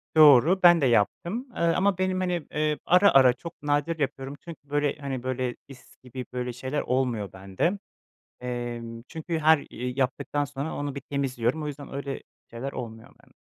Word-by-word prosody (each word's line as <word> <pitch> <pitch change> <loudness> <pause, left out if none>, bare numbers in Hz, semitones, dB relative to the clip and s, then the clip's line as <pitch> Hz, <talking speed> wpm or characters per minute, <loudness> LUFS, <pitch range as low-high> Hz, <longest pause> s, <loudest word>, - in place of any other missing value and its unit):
Doğru, 155 +4 +7
ben 175 -2 +8
de - - +3
yaptım, 170 - +1
ııı, 170 0 +2
ama 195 0 +2
benim, 185 0 0
hani, 180 -3 -1
ııı, 150 0 +1
ara 180 +4 +6
ara 130 -2 +6
çok 165 +5 -10
nadir 145 +3 0
yapıyorum 135 0 -3
çünkü 155 -4 -11
böyle, 145 -1 +1
hani, 135 -3 -4
böyle, 130 -1 -2
is 135 -2 -15
gibi 125 0 -7
böyle 125 0 -3
şeyler 130 +4 -3
olmuyor 125 -6 -1
bende. 95 - -1 0.6
Emm, 120 -2 -5
çünkü 165 +1 -3
her 160 0 +5
i 125 +2 -5
yaptıktan 140 +2 0
sonra 145 +2 -5
onu 145 -1 -3
bir 140 - -5
temizliyorum 135 0 -1
o - - -3
yüzden 145 -1 -7
öyle 140 -1 -4 0.3
şeyler 130 +4 -5
olmuyor 115 -2 -7
bende. - - -24
140 Hz, 175 wpm, -26 LUFS, 125-160 Hz, 0.6 s, ben